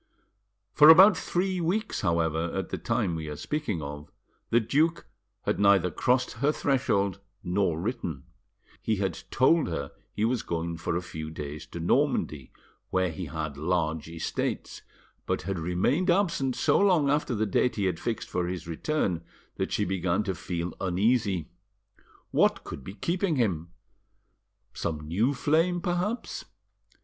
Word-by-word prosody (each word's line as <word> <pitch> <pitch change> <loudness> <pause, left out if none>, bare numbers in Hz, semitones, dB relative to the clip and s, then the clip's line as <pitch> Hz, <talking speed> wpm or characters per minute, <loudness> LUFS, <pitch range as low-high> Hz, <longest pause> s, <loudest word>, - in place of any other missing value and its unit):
For 150 +1 +8
about 190 +5 +9
three 185 0 -1
weeks, 190 +7 -1
however, 85 0 0
at - - -2
the - - -4
time 85 - 0
we 80 -1 -5
are 75 - -5
speaking 105 - -3
of, 75 +1 -7 0.4
the 120 - +4
duke 150 +9 +1 0.4
had 105 - -1
neither 100 -3 +4
crossed 125 +9 +1
her 145 +2 +4
threshold 100 -10 0 0.2
nor 90 -3 0
written. 85 - -3 0.6
He 110 - 0
had 95 -4 -2
told 155 +5 +3
her 70 -4 -4 0.2
he 105 - 0
was 120 0 +1
going 85 0 -3
for 85 - -2
a 90 - -1
few 80 -2 -6
days 75 -1 -7
to 85 - -8
Normandy, 75 -3 0 0.4
where 95 -2 +1
he 90 +3 -5
had 75 -1 -5
large 80 0 -1
estates, 80 -1 -3 0.5
but - - -1
had 95 0 -3
remained 95 - +1
absent 170 -8 +2
so - - +3
long 180 -8 +4
after 145 -4 0
the 110 +1 +1
date 115 +5 +1
he 100 - 0
had 90 -3 -1
fixed 115 -2 -3
for 90 -1 -1
his 90 -3 -5
return 85 - -1 0.3
that - - -2
she - - +1
began 95 +1 0
to 95 - -2
feel 85 0 -4
uneasy. 95 -2 +1 0.8
What - - +3
could 70 - -8
be 95 - -8
keeping 170 - 0
him? 90 - 0 1.0
Some 75 -2 -4
new 110 - +1
flame, 165 +6 +2
perhaps. 180 +7 -2
95 Hz, 155 wpm, -28 LUFS, -, 1.0 s, about